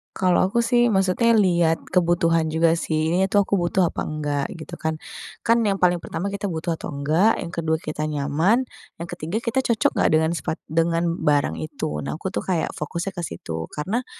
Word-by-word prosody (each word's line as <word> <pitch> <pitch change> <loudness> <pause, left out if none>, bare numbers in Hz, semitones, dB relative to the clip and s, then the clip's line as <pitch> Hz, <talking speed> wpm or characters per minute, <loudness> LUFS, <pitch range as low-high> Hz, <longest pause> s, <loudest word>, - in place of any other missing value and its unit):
Kalau 185 0 +3
aku 235 +5 +1
sih 240 0 +3
maksudnya 195 +5 +3
lihat 175 -5 +2
kebutuhan 170 -2 +2
juga, 165 +1 +2
sih. 155 0 0
Ini 185 +2 +2
tuh 200 +1 +3
aku 200 0 0
butuh 175 0 +1
apa - - -4
enggak, 145 -2 -2
gitu 170 +1 -9
kan. 160 0 -1 0.5
Kan 230 -1 +3
yang 200 - +2
paling 180 -1 +4
pertama 190 +4 -4
kita 200 0 -3
butuh 165 -1 -3
atau - - -7
enggak. 155 +10 +3
Yang 170 -1 -6
kedua 160 -1 +1
kita 155 0 -3
nyaman, 155 - +1 0.4
yang 175 - -6
ketiga 185 +10 -4
kita 235 +2 -1
cocok 235 -5 +2
nggak - - +3
dengan 160 +1 +3
sepat 165 -2 -3
dengan 165 +1 +1
barang 145 - +1
itu. 75 -1 -4
Nah, 75 - -4
aku 180 +4 -4
tuh - - -4
kayak 175 -4 0
fokusnya 170 +5 -3
ke 175 -3 -5
situ 80 0 -6
karena, 215 +12 -2
170 Hz, 195 wpm, -23 LUFS, 160-195 Hz, 0.5 s, paling